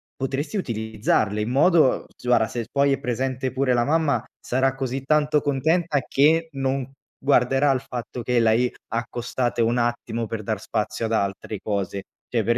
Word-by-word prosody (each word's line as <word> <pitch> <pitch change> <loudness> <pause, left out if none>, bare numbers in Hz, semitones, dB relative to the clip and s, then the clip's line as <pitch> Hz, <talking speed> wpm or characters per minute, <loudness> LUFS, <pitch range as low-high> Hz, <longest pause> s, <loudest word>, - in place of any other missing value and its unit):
potresti 140 +8 -3
utilizzarle 110 - 0
in 105 - -2
modo 150 +2 +4
s - - -16
guarda, 120 -2 +3
se 115 +1 -4
poi 140 0 +3
è 135 - -2
presente 130 0 -2
pure 130 0 +1
la 120 -1 +2
mamma, 155 -1 +1 0.2
sarà 130 +1 0
così 135 0 -3
tanto 150 +1 +3
contenta 155 +3 +1
che 160 +4 +3
non 135 -1 -1 0.3
guarderà 135 +1 +3
al 130 -2 0
fatto 125 -1 -6
che 125 +1 +1
l'hai 115 +2 +3 0.2
accostate 120 +1 -2
un 115 +2 +2
attimo 120 -1 -1
per 110 0 -5
dar 110 0 -2
spazio 110 +2 -2
ad 110 - -2
altre 100 0 -2
cose. 100 -2 -2 0.2
Cioè, 115 -2 0
per 120 +2 +1
125 Hz, 165 wpm, -24 LUFS, 115-140 Hz, 0.3 s, modo